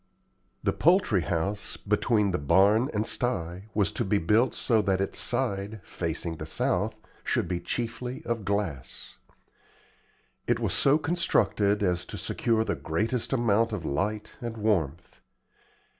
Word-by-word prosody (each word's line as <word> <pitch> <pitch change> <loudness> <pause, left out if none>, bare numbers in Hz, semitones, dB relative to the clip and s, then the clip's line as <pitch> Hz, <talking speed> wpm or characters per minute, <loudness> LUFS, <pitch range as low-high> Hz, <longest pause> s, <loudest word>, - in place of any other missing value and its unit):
The - - +1
poultry 170 - +3
house, 95 +5 -2
between 105 0 +1
the 90 - -1
barn 100 - +4
and 105 0 -1
sty, 95 -6 -2
was 100 -5 +2
to - - -1
be 100 +1 +1
built 105 +8 +2
so 115 -4 +2
that 95 -1 +1
its 95 - -1
side, 110 -4 0
facing 85 -1 -3
the 75 - -6
south, 105 +7 0 0.3
should - - 0
be 90 0 -2
chiefly 120 +7 -4
of 115 -2 -2
glass. 95 -11 -3 1.3
It - - +2
was - - 0
so 140 +2 +4
constructed 145 - +1
as 90 -2 +1
to 105 - -7
secure 110 +4 0
the - - -1
greatest 110 +9 -2
amount 115 -3 +2
of 90 -6 -4
light 105 +9 -2
and 120 -1 -5
warmth. 90 -7 -1
105 Hz, 145 wpm, -27 LUFS, 90-115 Hz, 1.3 s, barn